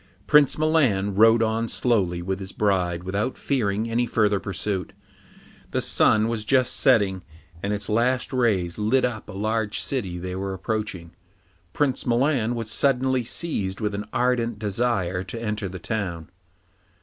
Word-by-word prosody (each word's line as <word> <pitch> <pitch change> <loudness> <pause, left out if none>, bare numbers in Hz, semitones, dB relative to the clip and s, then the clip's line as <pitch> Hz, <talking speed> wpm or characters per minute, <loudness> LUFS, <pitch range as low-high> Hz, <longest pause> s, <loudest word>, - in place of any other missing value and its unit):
Prince 150 -2 +5
Milan 135 -11 +2
rode 115 +3 +5
on 110 +1 0
slowly 95 -8 0
with 95 +1 -2
his 95 0 -7
bride 90 -4 0
without 100 +7 -2
fearing 110 -5 -1
any 120 +1 0
further 105 -3 +2
pursuit. 95 0 -3 0.8
The - - -1
sun 110 0 +3
was 115 -2 -2
just 130 +3 +2
setting, 100 -9 +3 0.4
and 100 - -2
its 105 -1 -3
last 125 +4 +1
rays 105 -8 +1
lit 120 +5 +2
up 110 -4 -4
a - - -7
large 110 +1 -1
city 100 -10 -3
they 90 +1 -5
were 95 0 -3
approaching. 95 -4 -4 0.6
Prince 140 -3 -1
Milan 120 -1 +1
was 115 -2 -4
suddenly 130 -1 +2
seized 105 - -3
with 105 -2 -2
an 105 +1 -4
ardent 120 -2 0
desire 100 -4 -1
to 115 +4 -6
enter 105 -3 -3
the 95 - -7
town. 90 -4 -4
110 Hz, 150 wpm, -24 LUFS, 95-120 Hz, 0.8 s, Prince